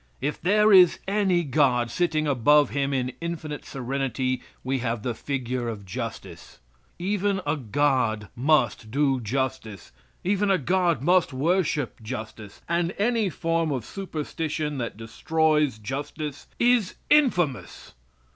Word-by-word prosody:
If 145 Hz, +2 st, -3 dB
there 210 Hz, +3 st, +4 dB
is 180 Hz, -3 st, +7 dB
any 195 Hz, -3 st, +2 dB
God, 130 Hz, -5 st, +2 dB
sitting 160 Hz, -3 st, 0 dB
above 145 Hz, +2 st, +4 dB
him 140 Hz, 0 st, 0 dB
in 130 Hz, -2 st, -1 dB
infinite 160 Hz, -3 st, -5 dB
serenity 130 Hz, -1 st, -2 dB, 0.2 s
we 130 Hz, +1 st, -1 dB
have 115 Hz, -3 st, -2 dB
the 125 Hz, -, -1 dB
figure 125 Hz, -1 st, -3 dB
of 105 Hz, -3 st, -5 dB
justice. 90 Hz, -, -7 dB, 0.4 s
Even 200 Hz, +1 st, 0 dB
a 145 Hz, +1 st, +1 dB
God 125 Hz, -5 st, 0 dB
must 125 Hz, -5 st, +1 dB
do 135 Hz, 0 st, +1 dB
justice; 120 Hz, -, -3 dB, 0.3 s
even 200 Hz, +2 st, +1 dB
a 195 Hz, -, +4 dB
God 170 Hz, -3 st, +1 dB
must 180 Hz, -2 st, +3 dB
worship 150 Hz, -3 st, 0 dB
justice; 110 Hz, -2 st, -8 dB
and 170 Hz, +1 st, 0 dB
any 225 Hz, -1 st, +1 dB
form 165 Hz, -1 st, -1 dB
of 130 Hz, -5 st, -3 dB
superstition 155 Hz, -4 st, -4 dB
that 115 Hz, -4 st, -4 dB
destroys 150 Hz, +4 st, +1 dB
justice 140 Hz, +5 st, -5 dB
is 240 Hz, -5 st, +2 dB, 0.2 s
infamous! 175 Hz, -, +1 dB
145 Hz, 125 wpm, -25 LUFS, 125-175 Hz, 0.4 s, is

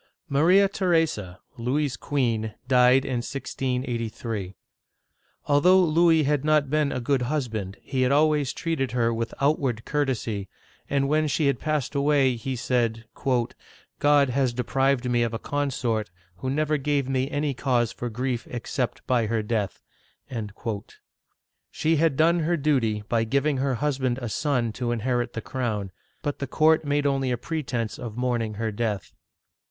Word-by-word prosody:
" -, -, -57 dB
Maria 185 Hz, +6 st, +6 dB
Theresa, 160 Hz, -, 0 dB, 0.2 s
Louis's 135 Hz, +3 st, 0 dB
queen, 115 Hz, -6 st, -1 dB
died 125 Hz, +1 st, +5 dB
in 130 Hz, -, -1 dB
1683. 120 Hz, -6 st, -3 dB, 0.9 s
Although 175 Hz, +6 st, +5 dB
Louis 165 Hz, -1 st, +4 dB
had 145 Hz, -1 st, +1 dB
not 150 Hz, -3 st, +2 dB
been 150 Hz, -2 st, +2 dB
a -, -, -2 dB
good 130 Hz, +2 st, +1 dB
husband, 115 Hz, -8 st, -2 dB
he 130 Hz, -2 st, -2 dB
had 130 Hz, +1 st, +3 dB
always 150 Hz, -2 st, +3 dB
treated 160 Hz, -8 st, -2 dB
her 115 Hz, -2 st, +2 dB
with 115 Hz, 0 st, -2 dB
outward 135 Hz, -5 st, +1 dB
courtesy, 120 Hz, -9 st, -1 dB, 0.4 s
and 140 Hz, -1 st, +1 dB
when 155 Hz, +2 st, +2 dB
she 150 Hz, +1 st, +1 dB
had 140 Hz, -3 st, +2 dB
passed 150 Hz, -4 st, -1 dB
away, 140 Hz, -2 st, +3 dB
he 130 Hz, +3 st, -4 dB
said, 115 Hz, -2 st, 0 dB, 0.4 s
" -, -, -26 dB
God 145 Hz, -2 st, +4 dB
has 130 Hz, -1 st, +1 dB
deprived 135 Hz, +1 st, +1 dB
me 120 Hz, -1 st, +2 dB
of 115 Hz, -1 st, 0 dB
a -, -, 0 dB
consort 120 Hz, -6 st, -1 dB, 0.3 s
who 130 Hz, +9 st, -3 dB
never 155 Hz, +2 st, +1 dB
gave 140 Hz, -1 st, 0 dB
me 135 Hz, 0 st, 0 dB
any 145 Hz, -1 st, -1 dB
cause 125 Hz, -3 st, +1 dB
for 120 Hz, -, -5 dB
grief 125 Hz, +1 st, -3 dB
except 125 Hz, +1 st, -3 dB
by 120 Hz, -3 st, +2 dB
her 110 Hz, 0 st, 0 dB
death." 105 Hz, -3 st, -2 dB, 1.9 s
She 160 Hz, +1 st, +1 dB
had 155 Hz, -3 st, +2 dB
done 170 Hz, +2 st, +4 dB
her 170 Hz, +2 st, +1 dB
duty 125 Hz, -8 st, +1 dB
by 115 Hz, 0 st, +1 dB
giving 140 Hz, +5 st, +1 dB
her 135 Hz, 0 st, 0 dB
husband 130 Hz, -1 st, 0 dB
a 120 Hz, -3 st, -4 dB
son 120 Hz, 0 st, 0 dB
to 120 Hz, +1 st, -2 dB
in 120 Hz, -2 st, -2 dB
herit 120 Hz, 0 st, -1 dB
the 115 Hz, -, -4 dB
crown; 110 Hz, -6 st, -3 dB, 0.3 s
but 145 Hz, -, -2 dB
the 140 Hz, -, -3 dB
court 155 Hz, +4 st, +3 dB
made 145 Hz, 0 st, 0 dB
only 135 Hz, -2 st, +1 dB
a 125 Hz, -, 0 dB
pretense 125 Hz, -5 st, -3 dB
of 115 Hz, -2 st, -6 dB
mourning 120 Hz, -4 st, -1 dB
her 110 Hz, +1 st, -2 dB
death. 105 Hz, -3 st, -3 dB
130 Hz, 160 wpm, -25 LUFS, 115-145 Hz, 1.9 s, Maria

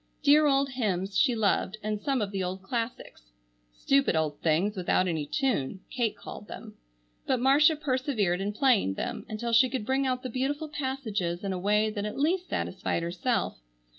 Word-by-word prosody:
Dear 300 Hz, +1 st, +6 dB
old 275 Hz, 0 st, +2 dB
hymns, 200 Hz, -7 st, -2 dB
she 250 Hz, -5 st, +3 dB
loved, 210 Hz, -1 st, +1 dB
and 210 Hz, -1 st, -2 dB
some 270 Hz, -3 st, 0 dB
of 200 Hz, -, -4 dB
the 195 Hz, -2 st, -2 dB
old 185 Hz, +1 st, -4 dB
classics. 225 Hz, -, -5 dB, 0.4 s
"Stupid 275 Hz, -, +2 dB
old 155 Hz, -2 st, -1 dB
things 170 Hz, +7 st, +1 dB
without 185 Hz, 0 st, +1 dB
any 160 Hz, -4 st, -2 dB
tune," 200 Hz, -, -1 dB
Kate 230 Hz, -5 st, -1 dB
called 205 Hz, +1 st, -9 dB
them. -, -, -9 dB, 0.5 s
But 260 Hz, -2 st, +2 dB
Marcia 285 Hz, +5 st, +5 dB
persevered 255 Hz, -, 0 dB
in 200 Hz, +1 st, -1 dB
playing 215 Hz, -, +2 dB
them -, -, -4 dB
until 230 Hz, +2 st, -3 dB
she 250 Hz, +3 st, +6 dB
could 245 Hz, -4 st, -3 dB
bring 265 Hz, +2 st, +1 dB
out 255 Hz, 0 st, -1 dB
the 255 Hz, -, -4 dB
beautiful 285 Hz, +5 st, -2 dB
passages 225 Hz, -, -3 dB
in 195 Hz, -1 st, -2 dB
a 185 Hz, -, -3 dB
way 210 Hz, +3 st, +2 dB
that 205 Hz, -1 st, -4 dB
at 210 Hz, -, -5 dB
least 350 Hz, +6 st, 0 dB
satisfied 170 Hz, -, -2 dB
herself. 180 Hz, -, -1 dB
220 Hz, 180 wpm, -28 LUFS, 190-265 Hz, 0.5 s, Dear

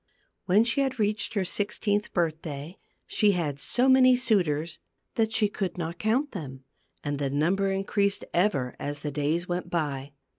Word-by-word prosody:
When 195 Hz, +4 st, +5 dB
she 240 Hz, +4 st, +2 dB
had 265 Hz, -2 st, -1 dB
reached 215 Hz, +1 st, 0 dB
her 195 Hz, -2 st, +1 dB
sixteenth 205 Hz, +2 st, -1 dB
birthday, 160 Hz, -2 st, -3 dB, 0.3 s
she 210 Hz, -1 st, +3 dB
had 150 Hz, -6 st, -2 dB
so 250 Hz, -, +1 dB
many 255 Hz, -1 st, +6 dB
suitors 170 Hz, -, +1 dB, 0.3 s
that 220 Hz, -1 st, +1 dB
she 220 Hz, -1 st, +2 dB
could 195 Hz, -3 st, -4 dB
not 170 Hz, 0 st, -4 dB
count 250 Hz, +7 st, +1 dB
them; 135 Hz, -8 st, -7 dB, 0.4 s
and 145 Hz, -1 st, -2 dB
the 140 Hz, -1 st, 0 dB
number 175 Hz, +8 st, +1 dB
increased 200 Hz, +1 st, 0 dB
ever 170 Hz, -9 st, +1 dB
as 145 Hz, 0 st, -4 dB
the 150 Hz, -, -3 dB
days 150 Hz, +5 st, -1 dB
went 175 Hz, 0 st, -3 dB
by. 145 Hz, -5 st, -2 dB
180 Hz, 160 wpm, -27 LUFS, 150-210 Hz, 0.4 s, many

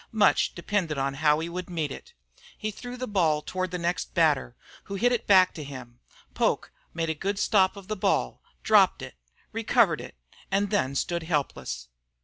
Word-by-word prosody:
Much 210 Hz, -3 st, +3 dB
depended 175 Hz, -4 st, -1 dB
on 135 Hz, 0 st, 0 dB
how 150 Hz, +1 st, +3 dB
he 165 Hz, -, -3 dB
would 180 Hz, +1 st, -6 dB
meet 160 Hz, -4 st, -2 dB
it. 475 Hz, 0 st, -10 dB, 0.4 s
He 215 Hz, 0 st, -3 dB
threw 245 Hz, +4 st, -8 dB
the 255 Hz, 0 st, -4 dB
ball 160 Hz, -7 st, +1 dB
toward 185 Hz, 0 st, -3 dB
the 180 Hz, -, -3 dB
next 175 Hz, +1 st, -2 dB
batter, 150 Hz, -7 st, +2 dB, 0.3 s
who 200 Hz, -, -5 dB
hit 245 Hz, +5 st, +2 dB
it 245 Hz, -, -1 dB
back 185 Hz, -4 st, +5 dB
at 150 Hz, -, -6 dB
him. 125 Hz, -3 st, -10 dB, 0.3 s
Poke -, -, 0 dB, 0.2 s
made 165 Hz, -1 st, -1 dB
a -, -, 0 dB
good 195 Hz, +6 st, -3 dB
stop 195 Hz, -2 st, +3 dB
of 195 Hz, -2 st, -11 dB
the 215 Hz, -, -2 dB
ball, 60 Hz, -, 0 dB, 0.2 s
dropped -, -, +4 dB
it, -, -, -8 dB, 0.4 s
recovered -, -, +2 dB
it, -, -, -10 dB, 0.3 s
and 200 Hz, +1 st, 0 dB
then 140 Hz, -10 st, +1 dB
stood 170 Hz, +4 st, -1 dB
helpless. 140 Hz, -, -3 dB
175 Hz, 185 wpm, -27 LUFS, 150-200 Hz, 0.4 s, back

